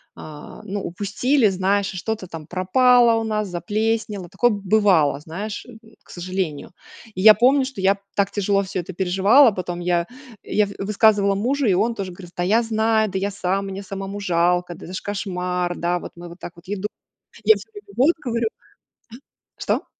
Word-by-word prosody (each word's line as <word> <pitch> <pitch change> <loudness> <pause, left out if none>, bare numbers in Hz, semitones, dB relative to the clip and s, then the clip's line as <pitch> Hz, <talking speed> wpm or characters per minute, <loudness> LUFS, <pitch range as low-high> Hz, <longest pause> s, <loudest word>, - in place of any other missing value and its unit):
а, 150 +4 -11
ну, 205 -1 -4
упустили, 210 +7 +1
знаешь, 195 +2 +1
что-то 195 +1 -4
там 165 -3 -8
пропало 235 +6 +4
у - - -3
нас, 215 -2 -1
заплеснело. 210 +1 -2
Такое 240 - +2
бывало, 195 -8 +2
знаешь, 200 +7 -6
м, 235 -3 -13 0.2
к - - -27
сожалению. 180 -4 -4 0.4
И 185 - -3
я 215 +2 +10
помню, 260 +6 +4
что 260 -6 -8
я 195 +1 +3 0.2
так 200 -1 +2
тяжело 200 -1 +1
всё 190 -1 -4
это 180 - -9
переживала. 195 - +5
Потом 180 -2 -5
я, 175 -1 0 0.4
я 210 - +1
в 200 - -9
высказывала 200 0 +3
мужу, 265 +7 0
и 190 - +4
он 225 +5 +1
тоже 190 -3 -5
говорит: 175 -1 -12
"Да 175 - 0
я 220 +6 +3
знаю, 220 -1 +1
да 190 - -3
я 200 +1 -2
сам, 195 0 -2
мне 195 +1 -6
самому 195 +1 -6
жалко, 175 -1 +1
да 175 - -12
это 185 - -9
ж - - -4
кошмар, 180 -3 -3
да, 175 +1 0
вот - - -9
мы 175 0 -10
вот 170 - -13
так 175 - -8
вот 170 - -17
еду". 205 +1 -3 0.6
Я 440 - +7
всё - - -10
время, 410 0 -12
вот, 285 +7 +5
говорю 235 -3 -1 1.1
А, - - -25
что? - - -1
195 Hz, 190 wpm, -22 LUFS, 180-220 Hz, 1.1 s, я